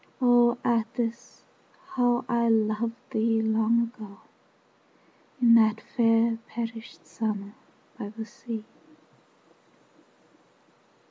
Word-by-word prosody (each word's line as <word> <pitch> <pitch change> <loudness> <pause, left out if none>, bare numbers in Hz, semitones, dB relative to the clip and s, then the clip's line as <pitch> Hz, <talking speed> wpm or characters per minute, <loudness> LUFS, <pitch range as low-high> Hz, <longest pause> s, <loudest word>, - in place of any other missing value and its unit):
O 245 -1 +4
Atthis, 230 0 -2 0.5
how 245 -6 +1
I 235 -1 +1
loved 220 +1 +1 0.2
thee 225 0 +1
long 220 +1 +2
ago 215 -4 -9 1.2
In 240 -2 +6
that 220 -1 +5
fair 225 0 +2
perished 230 -1 -7
summer 205 -3 -4 0.5
by 205 -3 -5
the 220 +1 -7
sea! 225 -1 -8
230 Hz, 85 wpm, -27 LUFS, 220-235 Hz, 1.2 s, In